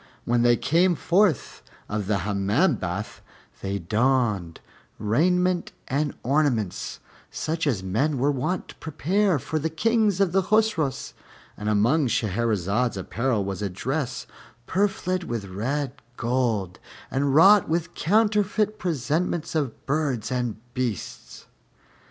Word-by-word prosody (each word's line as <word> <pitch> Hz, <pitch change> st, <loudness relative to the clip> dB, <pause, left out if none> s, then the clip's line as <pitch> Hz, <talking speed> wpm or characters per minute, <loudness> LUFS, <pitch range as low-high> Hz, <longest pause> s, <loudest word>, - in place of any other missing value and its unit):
When 120 Hz, 0 st, +2 dB
they 120 Hz, 0 st, +4 dB
came 170 Hz, +8 st, +3 dB
forth 180 Hz, -, +1 dB, 0.3 s
of 105 Hz, -2 st, -3 dB
the 105 Hz, -1 st, +2 dB
Hammam 105 Hz, -, +2 dB
bath, 95 Hz, +4 st, -5 dB, 0.4 s
they 100 Hz, 0 st, -2 dB
donned 105 Hz, -3 st, 0 dB, 0.4 s
raiment 180 Hz, -, +1 dB
and 145 Hz, +2 st, -1 dB
ornaments, 125 Hz, -, 0 dB, 0.3 s
such 160 Hz, 0 st, -2 dB
as 110 Hz, -9 st, 0 dB
men 130 Hz, +11 st, 0 dB
were 140 Hz, +3 st, +2 dB
wont 145 Hz, +7 st, -3 dB
prepare 180 Hz, +4 st, +1 dB
for 145 Hz, +3 st, -3 dB
the 160 Hz, +2 st, -1 dB
Kings 215 Hz, +3 st, +1 dB
of 195 Hz, -3 st, +3 dB
the 195 Hz, +2 st, +3 dB
Chosroës; 175 Hz, -10 st, 0 dB, 0.4 s
and 105 Hz, +1 st, -3 dB
among 120 Hz, +8 st, +3 dB
Shahrazad's 110 Hz, 0 st, 0 dB
apparel 115 Hz, +2 st, -1 dB
was 100 Hz, 0 st, -4 dB
a 100 Hz, -, -1 dB
dress 130 Hz, -, -3 dB, 0.4 s
purfled 185 Hz, -, 0 dB
with 115 Hz, -8 st, -3 dB
red 130 Hz, +8 st, -2 dB, 0.2 s
gold 115 Hz, -7 st, -1 dB, 0.3 s
and 135 Hz, 0 st, +1 dB
wrought 195 Hz, +4 st, +7 dB
with 165 Hz, +1 st, -1 dB
counterfeit 210 Hz, +2 st, +1 dB
presentments 160 Hz, +1 st, -1 dB
of 145 Hz, -7 st, -2 dB
birds 135 Hz, -6 st, -1 dB
and 125 Hz, -3 st, -1 dB, 0.2 s
beasts. 125 Hz, -7 st, -4 dB
135 Hz, 120 wpm, -25 LUFS, 110-170 Hz, 0.4 s, wrought